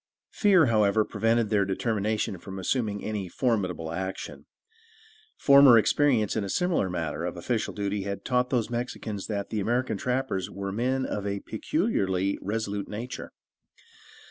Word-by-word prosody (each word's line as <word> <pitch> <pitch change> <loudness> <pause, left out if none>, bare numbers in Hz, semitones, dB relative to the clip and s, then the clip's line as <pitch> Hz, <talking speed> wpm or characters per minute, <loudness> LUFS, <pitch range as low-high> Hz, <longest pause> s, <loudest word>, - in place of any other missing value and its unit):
Fear, 190 -6 +4
however, 110 -2 +3
prevented 115 +1 +1
their 105 -2 +3
determination 105 0 -1
from 95 +2 -8
assuming 105 +1 -1
any 105 -3 -3
very - - -12
formidable 90 - -1
action. 95 +3 -5 0.9
Former 140 -3 +7
experience 115 -2 +2
in 110 - 0
a 100 - -4
similar 175 - +1
matter 80 -4 -3
of - - -4
official - - -1
duty 100 0 -2
had 100 0 -5
taught 125 -1 +1
those 120 -3 0
Mexicans 120 -4 -4
that 100 -2 -3
the 110 - -1
American 120 +2 0
trappers 125 -5 -1
were 100 0 -5
men 130 +5 0
of 100 -1 -3
a 100 -1 -2
peculiarly 100 - -1
resolute 105 -1 -3
nature. 115 +4 -6
105 Hz, 145 wpm, -27 LUFS, 100-125 Hz, 0.9 s, Former